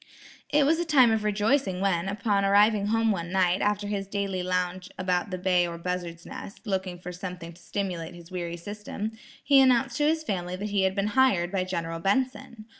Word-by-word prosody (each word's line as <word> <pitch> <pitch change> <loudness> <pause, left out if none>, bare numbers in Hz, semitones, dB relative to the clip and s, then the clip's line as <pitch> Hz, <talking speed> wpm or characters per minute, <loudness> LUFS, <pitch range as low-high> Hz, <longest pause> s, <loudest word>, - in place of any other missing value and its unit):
It 295 -1 +4
was 320 +3 +3
a - - +1
time 275 -8 +5
of 220 -1 +1
rejoicing 210 0 +1
when, 190 -2 0
upon 205 -1 0
arriving 205 +1 +4
home 225 +1 +2
one 170 -3 -3
night, 185 -1 +2
after 205 0 0
his 200 -1 -3
daily 195 -2 -2
lounge 180 +1 -2
about 185 0 0
the 185 - -3
Bay 180 -1 +2
or 170 0 -6
Buzzard's 170 -1 -4
Nest, 200 - -9
looking 190 -3 -2
for 180 0 -8
something 180 -2 -7
to 170 - -19
stimulate 180 -4 -4
his 170 +1 -13
weary 175 -2 -4
system, 210 +3 -5 0.3
he 280 -2 +6
announced 260 -1 +3
to 295 - +2
his 315 0 +1
family 180 - -3
that 205 +3 -4
he 200 -1 +2
had 190 0 0
been 200 +1 0
"hired" 195 -10 +3
by 190 -2 0
General 165 -3 -3
Benson. 235 +2 -1
195 Hz, 200 wpm, -27 LUFS, 180-215 Hz, 0.3 s, he